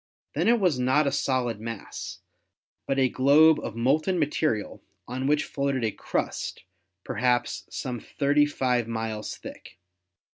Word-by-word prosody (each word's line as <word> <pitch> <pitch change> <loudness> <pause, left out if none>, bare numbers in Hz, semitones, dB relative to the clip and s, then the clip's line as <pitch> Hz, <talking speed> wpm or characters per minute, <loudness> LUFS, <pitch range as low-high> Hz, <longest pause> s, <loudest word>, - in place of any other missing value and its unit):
Then 165 +7 0
it 235 0 +5
was 175 -10 +2
not 130 +4 +3
a 140 - +1
solid 130 -5 0
mass, 105 -5 -7 0.7
but 135 - 0
a 130 -1 +4
globe 145 +5 +5
of 110 - -6
molten 155 +10 +1
material 150 -8 -1 0.3
on 130 +2 -3
which 150 +1 +3
floated 140 -3 -1
a 110 - 0
crust - - -3 0.4
perhaps 120 -5 0
some 125 -2 -4
thirty 145 +4 +2
five 125 -5 0
miles 110 -2 -4
thick. - - -11
130 Hz, 140 wpm, -26 LUFS, 115-145 Hz, 0.7 s, it